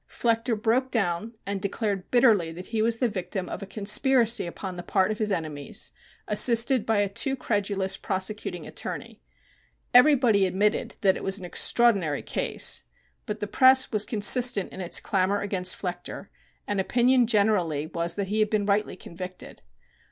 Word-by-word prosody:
Flechter 230 -1 -1
broke 245 +5 0
down 215 -1 -2
and 200 -1 -4
declared 200 -1 -3
bitterly 220 -9 +3
that 180 +2 -9
he 220 - 0
was 230 +1 +1
the 245 - +1
victim 185 -2 -5
of - - -7
a 195 - -8
conspiracy 225 +2 +2
upon 185 +2 -7
the 175 - -6
part 190 +3 0
of 215 - -5
his 215 -1 -1
enemies, 155 -5 -3 0.4
assisted 235 +3 +3
by 225 -1 +1
a 205 0 +1
too 265 +7 -2
credulous 200 -5 -2
prosecuting 190 -3 -4
attorney. - - -7 0.7
Everybody 245 -7 +5
admitted 200 +3 -1
that 190 -2 +3
it - - -8
was 195 0 +3
an 185 - -8
extraordinary 185 -4 +2
case, - - 0 0.4
but 215 0 -5
the - - -1
press 260 +4 +4
was 210 -2 +1
consistent 220 0 +4
in 190 - -7
its 180 - 0
clamor 195 +1 0
against 185 -2 -1
Flechter, 180 +1 -7 0.4
and 205 -1 -1
opinion 245 +3 +2
generally 200 -9 +1
was 170 +1 -1
that 200 -2 -4
he 215 +1 -1
had 215 -1 +2
been 210 -2 -1
rightly 205 +1 0
convicted. 180 +1 -10
205 Hz, 165 wpm, -25 LUFS, 185-230 Hz, 0.7 s, Everybody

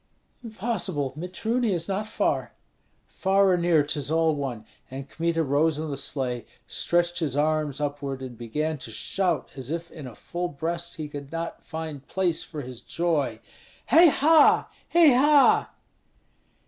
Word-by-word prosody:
"Impossible! 195 - -2
Mitruny 210 +7 -1
is 170 -2 -2
not 200 +2 -2
far." - - -1 0.5
"Far 195 0 +2
or - - +4
near, 170 -3 +3
'tis 145 -1 -3
all 160 0 +3
one!" 130 -7 -4 0.2
And 135 +1 -7
Kmita 165 +2 -1
rose 150 +2 +2
in 155 -1 -4
the - - -2
sleigh, 130 -4 -3 0.2
stretched 175 0 0
his 145 -5 -2
arms 150 -2 0
upward, 140 -2 -3
and 125 -2 -7
began 150 +7 -3
to - - -9
shout 185 -4 -1
as 130 -2 -6
if 170 +1 -4
in 150 -5 -9
a 120 - -10
full 175 +1 -4
breast 170 +3 -3
he 155 -2 -5
could 145 -1 -8
not 165 0 -5
find 160 -4 -7
place 180 -4 0
for 150 -3 -7
his 125 -2 -9
joy: 145 -10 -1 0.5
"Hei 340 +2 +8
ha! 310 +1 +5 0.2
hei 330 -5 +6
ha!" 285 +2 +5
160 Hz, 155 wpm, -26 LUFS, 140-180 Hz, 0.5 s, Hei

